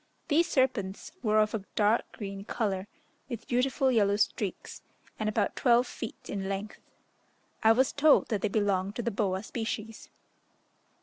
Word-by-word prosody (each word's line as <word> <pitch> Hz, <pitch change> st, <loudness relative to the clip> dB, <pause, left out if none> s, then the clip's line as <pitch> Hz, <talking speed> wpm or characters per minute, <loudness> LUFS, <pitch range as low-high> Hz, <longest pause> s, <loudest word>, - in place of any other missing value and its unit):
These 330 Hz, +3 st, +4 dB
serpents 235 Hz, -8 st, 0 dB
were 215 Hz, -3 st, +2 dB
of 215 Hz, 0 st, +2 dB
a 215 Hz, -3 st, -2 dB
dark 215 Hz, +2 st, +2 dB
green 195 Hz, -2 st, -6 dB
colour, 200 Hz, -3 st, -2 dB, 0.4 s
with 235 Hz, -4 st, -6 dB
beautiful 260 Hz, +1 st, +2 dB
yellow 205 Hz, -4 st, +3 dB
streaks, 210 Hz, -1 st, -2 dB, 0.4 s
and 215 Hz, -1 st, 0 dB
about 215 Hz, -1 st, 0 dB
twelve 245 Hz, -1 st, +4 dB
feet 230 Hz, -, -8 dB
in 195 Hz, -1 st, -3 dB
length. 200 Hz, +2 st, -4 dB, 0.8 s
I 220 Hz, 0 st, +6 dB
was 255 Hz, +2 st, +2 dB
told 295 Hz, +1 st, +4 dB
that 210 Hz, -5 st, -1 dB
they -, -, +1 dB
belonged 200 Hz, -1 st, 0 dB
to 240 Hz, -, -3 dB
the 235 Hz, -, -1 dB
boa 195 Hz, -2 st, -1 dB
species. 225 Hz, -1 st, -5 dB
215 Hz, 150 wpm, -29 LUFS, 200-240 Hz, 0.8 s, I